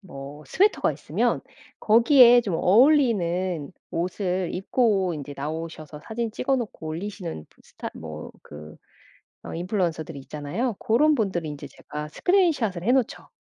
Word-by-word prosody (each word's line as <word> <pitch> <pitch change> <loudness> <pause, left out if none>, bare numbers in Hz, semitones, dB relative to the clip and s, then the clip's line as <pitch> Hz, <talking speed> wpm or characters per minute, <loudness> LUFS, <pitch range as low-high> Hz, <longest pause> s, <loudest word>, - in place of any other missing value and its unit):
뭐 145 -5 -10
스웨터가 410 +3 +2
있으면 - - -1 0.4
거기에 240 +2 +7
좀 190 -6 -2
어울리는 185 - +3 0.2
옷을 180 +1 -2
입고 195 -2 +1
인제 145 -1 -7
나오셔서 155 +1 -6
사진 225 0 -3
찍어 270 +4 0
놓고 215 -9 -5
올리시는 170 - -6
부 - - -28
스타 - - -8
뭐 80 -1 -8
그 75 +1 -11 0.7
어 - - -7
인플루언서들이 170 -4 -2
있잖아요. 155 - -3
고런 300 +8 +3
분들 190 - -1
인제 145 -2 -7
제가 150 0 -8
스크린 360 - +3
샷을 205 - -3
해 240 - +2
놓죠. 260 -3 0
185 Hz, 310 characters per minute, -25 LUFS, 155-235 Hz, 0.7 s, 거기에